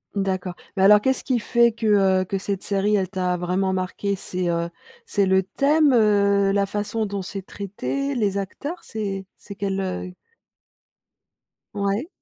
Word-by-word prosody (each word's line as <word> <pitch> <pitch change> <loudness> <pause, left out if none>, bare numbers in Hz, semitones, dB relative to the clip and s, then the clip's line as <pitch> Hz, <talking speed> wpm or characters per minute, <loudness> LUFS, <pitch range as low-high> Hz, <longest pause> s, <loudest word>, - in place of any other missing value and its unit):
D'accord. 190 -2 -2 0.2
Mais 190 - +2
alors 210 +1 +7
qu'est-ce 265 +1 +1
qui 255 -2 +1
fait 235 +2 +3
que, 230 -1 -5 0.4
heu, - - -2
que 195 +2 -2
cette 195 0 -3
série 205 +1 +1
elle 190 -2 0
t'a 180 -2 -1
vraiment 185 +2 0
marqué? 190 +2 -2
C'est, 180 -1 -3
heu, 170 0 -1 0.4
c'est 200 - +1
le 190 0 +3
thème? 285 - +3
Heu, 200 -3 +4
la 200 0 +2
façon 210 +2 -2
dont 200 -1 -3
c'est 195 +1 -6
traité? 270 +8 -3
Les 200 -4 0
acteurs? 285 - -5
C'est 195 -3 -4
c'est 200 - -10
quel, 195 -1 -2
heu 185 -1 -4 1.6
Ouais. 200 +7 -1
200 Hz, 160 wpm, -23 LUFS, 190-210 Hz, 1.6 s, alors